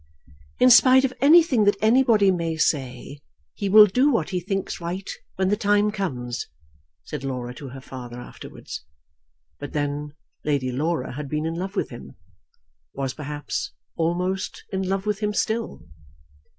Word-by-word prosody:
"In 255 Hz, 0 st, +6 dB
spite 260 Hz, +2 st, +7 dB
of 255 Hz, -, -2 dB
anything 290 Hz, -6 st, +6 dB
that 205 Hz, 0 st, +4 dB
anybody 220 Hz, -3 st, +4 dB
may 165 Hz, -3 st, -2 dB
say, 135 Hz, -2 st, -1 dB, 0.3 s
he 200 Hz, -, -3 dB
will 210 Hz, +2 st, +9 dB
do 250 Hz, +8 st, +2 dB
what 190 Hz, -, 0 dB
he 180 Hz, -, 0 dB
thinks 195 Hz, 0 st, -3 dB
right 180 Hz, +3 st, -4 dB, 0.3 s
when 190 Hz, 0 st, +1 dB
the 205 Hz, -, +3 dB
time 205 Hz, -1 st, +2 dB
comes," 125 Hz, -, -4 dB, 0.6 s
said 150 Hz, -3 st, -6 dB
Laura 125 Hz, -2 st, -4 dB
to 135 Hz, +1 st, -9 dB
her 135 Hz, +1 st, -10 dB
father 125 Hz, -2 st, -9 dB
afterwards. 125 Hz, -, -9 dB, 0.8 s
But 145 Hz, -, -7 dB
then 145 Hz, 0 st, -3 dB, 0.3 s
Lady 140 Hz, -4 st, 0 dB
Laura 150 Hz, +1 st, -1 dB
had 140 Hz, +1 st, -6 dB
been 150 Hz, +1 st, -2 dB
in 165 Hz, -, -2 dB
love 190 Hz, +4 st, -5 dB
with -, -, -2 dB
him, 65 Hz, 0 st, -10 dB, 0.8 s
was 135 Hz, -1 st, -2 dB
perhaps 150 Hz, -1 st, -5 dB, 0.2 s
almost 180 Hz, +3 st, -2 dB
in 190 Hz, -, 0 dB
love 190 Hz, +1 st, -2 dB
with 210 Hz, -1 st, -1 dB
him 210 Hz, -1 st, -1 dB
still. 220 Hz, -, -2 dB
175 Hz, 155 wpm, -24 LUFS, 140-210 Hz, 0.8 s, will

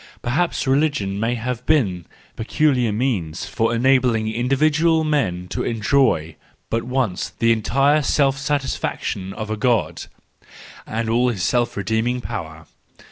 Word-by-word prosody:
Perhaps 155 Hz, +9 st, 0 dB
religion 135 Hz, -8 st, +1 dB
may 115 Hz, +3 st, 0 dB
have 120 Hz, +1 st, -4 dB
been 100 Hz, -, +1 dB, 0.3 s
the -, -, -5 dB
peculiar 130 Hz, -3 st, +2 dB
means 105 Hz, -10 st, -2 dB
for 115 Hz, +8 st, 0 dB
enabling 120 Hz, -2 st, +2 dB
individual 155 Hz, +7 st, +2 dB
men 95 Hz, -, -1 dB
to -, -, -3 dB
enjoy 110 Hz, -, +1 dB, 0.3 s
but 115 Hz, -, +1 dB
once 125 Hz, -6 st, -2 dB
the 115 Hz, 0 st, +3 dB
entire 135 Hz, +7 st, +2 dB
self 140 Hz, -1 st, +2 dB
satisfaction 140 Hz, -9 st, -2 dB
of 110 Hz, +1 st, -6 dB
a 110 Hz, -, -2 dB
God 120 Hz, 0 st, 0 dB, 0.8 s
and 115 Hz, +1 st, -2 dB
all 120 Hz, +2 st, +2 dB
his 100 Hz, -7 st, -3 dB
self 120 Hz, +1 st, 0 dB
redeeming 110 Hz, +5 st, 0 dB
power. 80 Hz, -8 st, -6 dB
120 Hz, 135 wpm, -21 LUFS, 110-135 Hz, 0.8 s, the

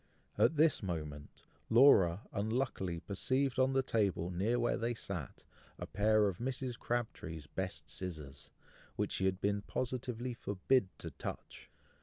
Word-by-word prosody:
At 160 Hz, -, +4 dB
this 155 Hz, +1 st, +4 dB
moment 75 Hz, -6 st, -5 dB, 0.3 s
Laura 105 Hz, -8 st, +6 dB
unluckily 105 Hz, -5 st, -1 dB
perceived 130 Hz, +6 st, 0 dB
on 130 Hz, +1 st, +4 dB
the 135 Hz, 0 st, +3 dB
table 100 Hz, -7 st, 0 dB
near 105 Hz, +7 st, +1 dB
where 120 Hz, -, +2 dB
they 120 Hz, +1 st, -1 dB
sat, 90 Hz, -, -6 dB, 0.3 s
a -, -, -5 dB
pair 105 Hz, +1 st, +3 dB
of 95 Hz, -3 st, -3 dB
Mrs. 125 Hz, 0 st, -2 dB
Crabtree's 90 Hz, -10 st, -3 dB
best -, -, -5 dB
scissors, 75 Hz, -7 st, -7 dB, 0.5 s
which -, -, -1 dB
she 95 Hz, -, 0 dB
had 95 Hz, 0 st, +1 dB
been 100 Hz, 0 st, 0 dB
positively 125 Hz, +1 st, -3 dB
forbid 105 Hz, +1 st, +1 dB
to 80 Hz, -, -6 dB
touch. -, -, -7 dB
105 Hz, 140 wpm, -34 LUFS, 90-125 Hz, 0.5 s, Laura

